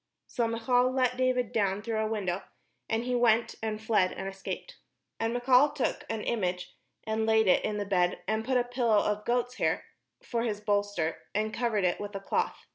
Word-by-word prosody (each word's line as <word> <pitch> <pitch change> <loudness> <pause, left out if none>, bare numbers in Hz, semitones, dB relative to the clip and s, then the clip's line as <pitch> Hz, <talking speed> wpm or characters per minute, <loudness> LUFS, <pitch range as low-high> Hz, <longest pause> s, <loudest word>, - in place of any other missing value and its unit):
So 235 -2 -1
Michal 245 +2 +2
let 255 -1 +1
David 255 -2 +1
down 200 -1 0
through 225 -1 -1
a 220 - +1
window: 200 -4 -2 0.5
and 225 +1 0
he 250 0 -2
went, 235 -2 +3
and 215 -1 -2
fled, 215 -4 +2
and 195 - -5
escaped. 195 0 -6 0.4
And 225 0 0
Michal 250 +4 +4
took 290 -3 -2
an 220 -1 -3
image, 180 -5 -2 0.3
and 220 0 -1
laid 220 0 +4
it 185 - +4
in 210 - -1
the 205 - -2
bed, 180 -2 +1
and 220 0 0
put 255 +2 +1
a 245 - +3
pillow 245 -3 +1
of 210 0 0
goats' 245 +1 0
hair - - 0 0.4
for 235 -2 -2
his 215 -3 -1
bolster, 205 -6 0 0.2
and 215 +1 0
covered 225 -5 0
it 180 -1 +1
with 205 0 -6
a - - -2
cloth. 195 - -2
220 Hz, 200 wpm, -29 LUFS, 205-245 Hz, 0.5 s, Michal